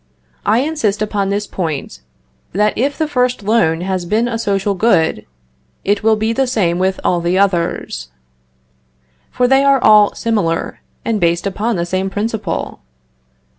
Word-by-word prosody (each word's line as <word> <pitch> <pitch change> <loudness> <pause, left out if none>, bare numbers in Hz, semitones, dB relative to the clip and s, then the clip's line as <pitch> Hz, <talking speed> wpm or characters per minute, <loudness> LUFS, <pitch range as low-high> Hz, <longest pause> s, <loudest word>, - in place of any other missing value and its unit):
I 220 +4 +4
insist 275 -9 -1
upon 205 -2 -1
this 205 +1 -1
point 160 - -4 0.5
that 210 +3 +1
if 275 +5 -1
the 315 - 0
first 250 -5 0
loan 195 -7 +2
has 185 0 -2
been 215 +7 0
a 230 -2 -3
social 200 -2 0
good, 175 - +1 0.6
it 200 +1 +1
will 220 0 +3
be 220 +1 -1
the 265 +2 +1
same 180 -8 0
with 190 +1 0
all 175 -1 +1
the 175 +2 0
others; 170 - -1 1.2
for 250 - +1
they 270 +2 +4
are 275 -1 +5
all 210 -3 +5
similar, 205 -8 -1 0.3
and 220 -3 -1
based 170 +1 +1
upon 210 +4 -1
the 170 -1 -1
same 185 +2 -2
principle. 215 +2 -3
205 Hz, 155 wpm, -17 LUFS, 180-230 Hz, 1.2 s, are